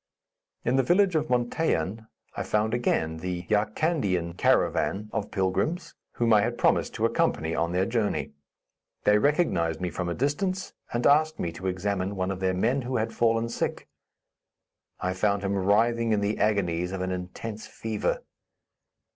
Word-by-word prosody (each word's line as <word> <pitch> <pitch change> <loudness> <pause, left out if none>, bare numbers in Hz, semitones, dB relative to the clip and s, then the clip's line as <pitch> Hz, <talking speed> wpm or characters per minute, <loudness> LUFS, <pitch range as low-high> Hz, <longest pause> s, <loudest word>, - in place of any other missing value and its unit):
In 125 +3 +2
the - - +5
village 180 +7 +3
of 155 -1 +1
Montaiyan, 115 - 0 0.3
I - - -3
found 105 +1 0
again 80 -9 0
the 90 +1 -4
Yarkandien 105 - 0
caravan 105 +3 +1
of 110 -2 -2
pilgrims, 155 - -1 0.2
whom 115 -1 +2
I 105 - +6
had - - -1
promised - - +2
to - - +1
accompany 80 +1 +1
on 85 +1 0
their 90 +2 +1
journey. 115 -1 -1 0.7
They 105 0 +5
recognized 105 - +1
me 90 -1 -2
from 90 +2 -3
a 85 - -2
distance, 185 +8 -1 0.2
and 120 0 -1
asked 155 +2 +4
me 85 - -2
to 95 +3 -6
examine 95 +1 -1
one 95 0 -1
of 95 - -4
their 95 -1 0
men, 120 +9 +1
who 125 +1 -2
had 110 +1 -1
fallen 115 0 +2
sick. 115 - -3 1.1
I 90 0 -1
found 100 +1 0
him 100 0 0
writhing 115 +4 +2
in 105 - +1
the 105 +1 -1
agonies 90 -5 +1
of 95 - -3
an 95 0 -2
intense 90 +4 -6
fever. 110 -2 -2
105 Hz, 165 wpm, -27 LUFS, 95-120 Hz, 1.1 s, I